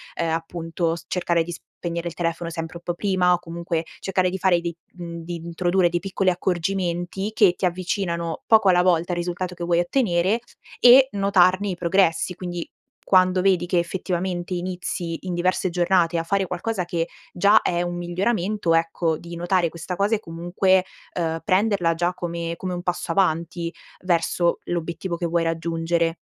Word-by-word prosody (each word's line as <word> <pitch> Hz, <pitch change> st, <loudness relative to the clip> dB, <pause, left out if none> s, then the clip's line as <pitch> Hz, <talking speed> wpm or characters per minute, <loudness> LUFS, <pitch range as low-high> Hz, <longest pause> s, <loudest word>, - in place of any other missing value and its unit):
ehm, 170 Hz, -, -1 dB
appunto 165 Hz, 0 st, -2 dB
s 165 Hz, -, -11 dB
cercare 170 Hz, -2 st, +1 dB
di 175 Hz, -, -7 dB, 0.3 s
spegnere 170 Hz, 0 st, -3 dB
il 170 Hz, -, -6 dB
telefono 170 Hz, 0 st, -2 dB
sempre 165 Hz, +1 st, -5 dB
un 170 Hz, -, -15 dB
po' 175 Hz, -, -2 dB
prima, 185 Hz, -2 st, +2 dB
o 175 Hz, -, +1 dB
comunque 170 Hz, -1 st, -3 dB
cercare 185 Hz, -1 st, +1 dB
di 190 Hz, -, -3 dB
fare 180 Hz, -2 st, +3 dB
dei 170 Hz, -1 st, -4 dB, 0.2 s
mhmm, 170 Hz, -1 st, -7 dB
di 175 Hz, +1 st, -5 dB
introdurre 175 Hz, +2 st, +1 dB
dei 175 Hz, 0 st, -1 dB
piccoli 195 Hz, 0 st, 0 dB
accorgimenti 180 Hz, +2 st, -2 dB
che 205 Hz, -5 st, +5 dB
ti 190 Hz, -, -1 dB
avvicinano 175 Hz, -2 st, -2 dB
poco 220 Hz, -3 st, +5 dB
alla 180 Hz, -1 st, +5 dB
volta 175 Hz, -1 st, +2 dB
al -, -, -3 dB
risultato 180 Hz, +1 st, -3 dB
che 175 Hz, -, -6 dB
vuoi 170 Hz, 0 st, +2 dB
ottenere, 185 Hz, 0 st, +1 dB, 0.4 s
e 260 Hz, +2 st, +8 dB
notarne 195 Hz, -1 st, +3 dB
i 185 Hz, -, -2 dB
progressi, 175 Hz, 0 st, +1 dB
quindi, 175 Hz, -1 st, -5 dB, 0.4 s
quando 185 Hz, -1 st, +4 dB
vedi 185 Hz, -2 st, +2 dB
che 175 Hz, 0 st, +2 dB
effettivamente 180 Hz, 0 st, -2 dB
inizi 175 Hz, -2 st, -3 dB
in 180 Hz, -, -2 dB
diverse 185 Hz, +2 st, +1 dB
giornate 175 Hz, -1 st, +2 dB
a 165 Hz, -, 0 dB
fare 195 Hz, +3 st, 0 dB
qualcosa 185 Hz, +3 st, -2 dB
che 170 Hz, -1 st, -2 dB, 0.2 s
già 200 Hz, +4 st, +5 dB
è 175 Hz, -1 st, 0 dB
un 175 Hz, 0 st, -2 dB
miglioramento, 180 Hz, +1 st, 0 dB
ecco, 165 Hz, 0 st, 0 dB
di 170 Hz, +1 st, -9 dB
notare 175 Hz, 0 st, +1 dB
questa 170 Hz, +2 st, -6 dB
cosa 200 Hz, +4 st, +2 dB
e -, -, -3 dB
comunque, 180 Hz, +1 st, +1 dB, 0.3 s
ehm, 165 Hz, -2 st, -1 dB
prenderla 195 Hz, -3 st, +2 dB
già 175 Hz, +2 st, 0 dB
come 170 Hz, -1 st, -4 dB
come 185 Hz, +1 st, -4 dB
un 175 Hz, -, -4 dB
passo 180 Hz, -1 st, -2 dB
avanti 170 Hz, -1 st, 0 dB, 0.3 s
verso 170 Hz, -1 st, +1 dB
l'obiettivo 170 Hz, +1 st, -3 dB
che 170 Hz, +1 st, -3 dB
vuoi 170 Hz, 0 st, +1 dB
raggiungere. 165 Hz, 0 st, 0 dB
175 Hz, 175 wpm, -23 LUFS, 170-185 Hz, 0.4 s, e